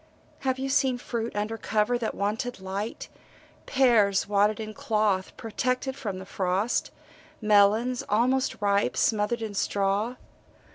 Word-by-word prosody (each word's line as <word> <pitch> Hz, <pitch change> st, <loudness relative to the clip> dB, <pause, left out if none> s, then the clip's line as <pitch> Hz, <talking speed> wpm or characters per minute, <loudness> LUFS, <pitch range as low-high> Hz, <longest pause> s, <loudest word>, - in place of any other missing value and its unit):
Have 260 Hz, -1 st, -1 dB
you 265 Hz, +1 st, -3 dB
seen 270 Hz, -2 st, +2 dB
fruit 235 Hz, -2 st, -4 dB
under 215 Hz, +2 st, -2 dB
cover 215 Hz, +4 st, +1 dB
that 225 Hz, -, -3 dB
wanted 220 Hz, +5 st, -2 dB
light 195 Hz, +3 st, -5 dB, 0.6 s
pears 220 Hz, -8 st, +3 dB
wadded 205 Hz, +2 st, +2 dB
in 215 Hz, -1 st, -5 dB
cloth, 210 Hz, -4 st, 0 dB
protected 255 Hz, +4 st, -2 dB
from 210 Hz, -9 st, -4 dB
the 190 Hz, -, -8 dB
frost, 190 Hz, +5 st, 0 dB, 0.5 s
melons, 215 Hz, +3 st, +3 dB
almost 255 Hz, +5 st, +1 dB
ripe, 200 Hz, 0 st, +2 dB
smothered 220 Hz, +2 st, +1 dB
in 215 Hz, -2 st, -4 dB
straw? 200 Hz, +4 st, 0 dB
215 Hz, 130 wpm, -27 LUFS, 205-245 Hz, 0.6 s, pears